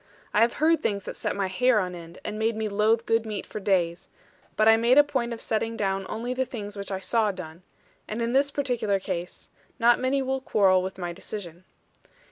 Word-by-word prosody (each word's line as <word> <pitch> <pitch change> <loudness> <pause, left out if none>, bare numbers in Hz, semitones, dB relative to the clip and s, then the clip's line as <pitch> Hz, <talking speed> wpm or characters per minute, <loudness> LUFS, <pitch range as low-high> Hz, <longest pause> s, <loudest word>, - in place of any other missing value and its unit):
I 210 - +4
have 230 +1 +4
heard 325 +2 +2
things 200 -2 -1
that - - -6
set - - -2
my 200 -1 0
hair 225 +5 +3
on 180 -2 -2
end, 170 -1 -10
and 215 0 -4
made 225 +1 +1
me 220 0 -2
loathe 215 +3 +2
good 225 0 +2
meat 215 -3 -5
for - - -6
days; 180 -4 0 0.5
but 215 - +3
I 225 - +8
make 235 +4 +3
a 290 - +9
point 255 -4 -2
of 230 - -5
setting 225 +1 -2
down 195 -1 -1
only 240 +3 -3
the 260 +1 0
things 210 -5 -7
which 200 0 -6
I 190 - -1
saw 210 +3 +1
done; 175 -3 -9 0.5
and 215 - -4
in 235 +1 -1
this 280 +1 +3
particular 245 -8 0
case, 175 -1 -6 0.3
not 240 0 +4
many 265 +1 +1
will 265 0 -2
quarrel 190 -6 +3
with 190 +1 -5
my 175 -2 -4
decision. 185 -2 -8
215 Hz, 220 wpm, -26 LUFS, 190-235 Hz, 0.5 s, a